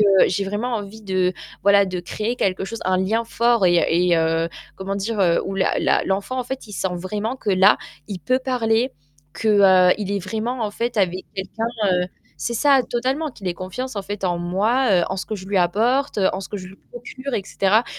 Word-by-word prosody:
heu, 195 -2 +6
j'ai 195 +2 -1
vraiment 225 +5 -2
envie 210 +1 -8
de, 185 -2 0 0.3
voilà, 200 0 +5
de 185 -2 -4
créer 215 +7 -3
quelque 190 -4 0
chose, 225 +3 -6
un 185 0 +3
lien 215 +5 0
fort 235 -2 +2
et 175 -1 +4
heu - - +2
et 175 +1 +3
heu, 165 0 +1 0.3
comment 195 +1 -4
dire, 210 +2 -2
heu, 175 -3 +3
où 195 - -4
la 190 -1 +1
la - - +2
l'enfant, 200 +7 -2
en - - -4
fait, 265 0 -6
il 210 - -11
sent 190 - -1
vraiment 210 +7 -3
que, 215 - -2
là, 190 +2 +6 0.3
il 195 - -5
peut 255 +7 +1
parler, 250 -1 0 0.4
que, 220 - -1 0.4
heu, - - +5
il 200 -2 -3
est 200 0 -1
vraiment, 225 +5 -2
en 210 - -2
fait, 235 +3 -3
avec 185 -2 0
quelqu'un, 200 +4 -3 0.3
heu 180 0 +1 0.4
c'est 235 - -1
ça, 275 +3 +4
totalement, 265 +6 -1
qu'il 205 -6 -11
ait - - 0
confiance, 190 +8 -6
en 200 - -2
fait, 205 +1 -5
en 175 -2 0
moi, 210 +9 +1
heu, - - +1
en 190 - -2
ce - - -4
que 220 - -3
je 190 -3 -8
lui 200 0 +1
apporte, 230 +11 +1
heu, 195 -2 +3
en 190 - -3
ce 195 - -8
que 210 - -5
je 185 -2 -8
lui 190 - -14
procure 260 +2 -6
et 200 - -1
cetera. 200 +4 +2
200 Hz, 235 wpm, -22 LUFS, 185-235 Hz, 0.4 s, heu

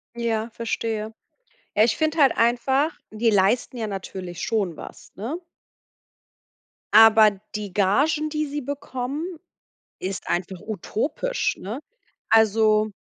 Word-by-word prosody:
Ja, 230 -1 -1
verstehe. 225 -1 -3 0.6
Ja, 210 - +5
ich 220 -1 +2
finde 315 +1 0
halt 275 -4 +5
einfach, 265 +6 +2 0.2
die 225 +2 +1
leisten 210 +5 +2
ja 220 -2 -2
natürlich 185 -3 -6
schon 200 -8 -1
was, - - -11
ne? 250 - -4 1.5
Aber 220 -1 +8 0.2
die 205 -3 -5
Gagen, 290 +11 +2
die 305 0 -1
sie 290 +1 -4
bekommen, 275 +1 -4 0.7
ist 190 +1 -5
einfach 180 +1 -2
utopisch, 285 - -2
ne? 220 +8 -6 0.5
Also 215 -1 +4
225 Hz, 115 wpm, -24 LUFS, 210-270 Hz, 1.5 s, Aber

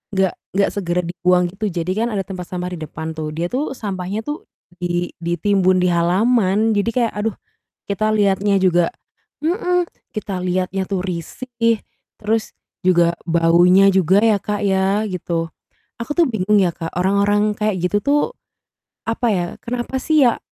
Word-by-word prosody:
nggak 190 -1 +2 0.2
nggak 200 - +3
segera 180 -3 -1
dibuang 180 0 +1
gitu 205 +4 -5
jadi 175 +1 -2
kan - - -1
ada 195 - 0
tempat 185 -2 -7
sampah 180 0 -4
di 175 - -6
depan 160 +1 -6
tuh, 155 -1 -3
dia 170 +2 -2
tuh 270 +1 -1
sampahnya 195 0 -4
tuh 295 +4 -5 0.3
di 175 0 -1
ditimbun 185 +2 +2
di 180 - +3
halaman, 200 +4 +2
jadi 205 +3 +1
kayak 235 -3 +2
aduh, 210 0 -1 0.5
kita 215 +2 0
lihatnya 200 -1 +2
juga 175 -2 +3 0.5
mhm. 360 0 +1 0.3
Kita 205 -3 -3
lihatnya 185 +1 -1
tuh 190 -2 -1
risih, 230 +6 -2 0.4
terus 220 +1 -1 0.3
juga 170 -2 +4 0.2
baunya 175 +4 +5
juga 190 +2 +4
ya 220 -3 +4
Kak 205 +1 -3
ya, 195 +1 +2
gitu. 165 -2 -3 0.5
Aku 235 +6 -4
tuh 345 - +5
bingung 210 -2 0
ya 175 - +2
Kak, 165 0 -7
orang-orang 200 +3 +2
kayak 210 -2 0
gitu 195 +3 +1
tuh, 290 +4 +3 0.9
apa 235 +1 0
ya, 175 -3 0 0.2
kenapa 245 +2 -3
sih 310 -2 +3
ya, 235 - +3
195 Hz, 160 wpm, -20 LUFS, 180-215 Hz, 0.9 s, baunya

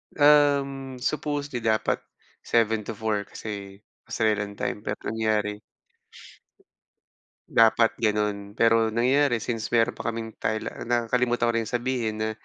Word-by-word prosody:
Um, 140 -2 +3
supposedly 145 -3 -2
dapat 110 -1 +1 0.4
7:00-4:00 110 -2 0
kasi 100 -1 -8 0.2
Australian 105 -2 0
time, 105 - -3
pero 105 0 -3
ang - - -3
nangyari. 105 -2 0 1.9
Dapat 115 0 +4
ganon, 105 -2 -1
pero 115 -1 +4
nangyari 125 +2 +2
since 115 -1 -4
meron 120 0 +2
pa 115 - -3
kaming 115 -1 -6
Thaila 110 0 -2 0.2
nakakalimutan 120 0 +1
ko 115 - +1
rin 115 - +1
sabihin 120 -3 -1
na 110 0 0
115 Hz, 115 wpm, -25 LUFS, 110-120 Hz, 1.9 s, Dapat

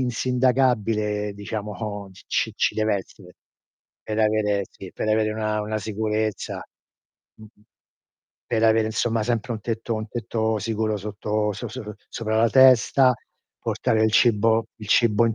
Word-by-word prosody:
insindacabile 120 -5 +1
diciamo 105 0 -5
c - - -17
c - - 0
ci - - +1
dev'essere, 100 -4 -3 0.7
per 110 0 -4
avere 105 -2 +2
sì, 95 - -11
per - - -3
avere 110 0 +2
una 110 -1 -1
una 110 +1 -3
sicurezza. 110 0 -2 0.7
Mh-mh. 110 -1 -17 0.8
Per 115 -1 0
avere 110 0 +4
insomma 115 0 0
sempre 120 0 -1
un 110 - -5
tetto 115 +1 -3
un 110 0 -4
tetto 110 -1 -1
sicuro 110 0 -1
sotto 105 +1 -2
so - - -6
so 110 -5 -7
sopra 110 -1 -2
la 115 +1 +4
testa, 130 0 +6 0.5
portare 110 -1 0
il 110 - +3
cibo 115 -1 +3
il 105 - -10
cibo 115 0 +4
in 115 - 0
110 Hz, 140 wpm, -24 LUFS, 105-115 Hz, 0.8 s, testa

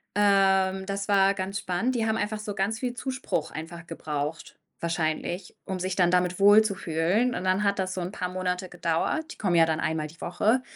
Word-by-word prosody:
Ähm, 195 -2 +3
das 200 +1 -3
war 195 -1 +5
ganz 195 +1 -3
spannend. 210 +8 -1
Die 225 -1 0
haben 220 - +1
einfach 215 0 -2
so 210 -2 -5
ganz 205 +4 -1
viel 250 -2 -2
Zuspruch 260 +1 -3
einfach 170 +2 -8
gebraucht 150 -1 -4 0.3
wahrscheinlich, 170 +2 -2
um 190 - -3
sich 185 +1 -2
dann 175 -2 +4
damit 180 0 +1
wohlzufühlen 205 +1 +3
und - - -3
dann 185 +2 +2
hat 200 0 +2
das 190 0 -1
so 185 - -4
'n 175 - -4
paar 180 -3 -3
Monate 180 0 -2
gedauert, 180 - -1
die - - -20
kommen 185 -5 0
ja 165 - +7
dann 160 0 -1
einmal 160 -1 -1
die 165 +2 -17
Woche, 220 +8 +1
190 Hz, 200 wpm, -27 LUFS, 175-205 Hz, 0.3 s, ja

